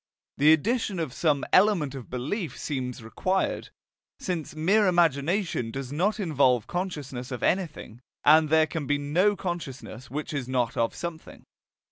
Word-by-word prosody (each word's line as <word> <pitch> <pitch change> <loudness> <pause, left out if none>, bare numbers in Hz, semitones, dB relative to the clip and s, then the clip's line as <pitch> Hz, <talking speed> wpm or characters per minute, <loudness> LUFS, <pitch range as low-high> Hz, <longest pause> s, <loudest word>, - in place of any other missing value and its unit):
The 150 +2 +7
addition 210 - +1
of 160 -7 -3
some 150 -4 +1
element 185 -8 +4
of 135 -4 -8
belief 140 - -3
seems 125 -5 -4
required, 185 - -1 0.5
since 165 -5 -4
mere 195 +7 +3
imagination 170 - +1
does 135 +2 -6
not 200 +8 0
involve 140 - +2
consciousness 145 -9 -4
of 125 -3 -5
anything, 155 - -1 0.2
and 155 +1 +6
there 160 0 +5
can 155 -2 -5
be 145 - +2
no 175 +9 +2
consciousness 140 - -6
which 150 +3 -5
is 140 -4 -3
not 125 -3 0
of 115 0 0
something. 170 -2 -7
155 Hz, 145 wpm, -26 LUFS, 130-180 Hz, 0.5 s, The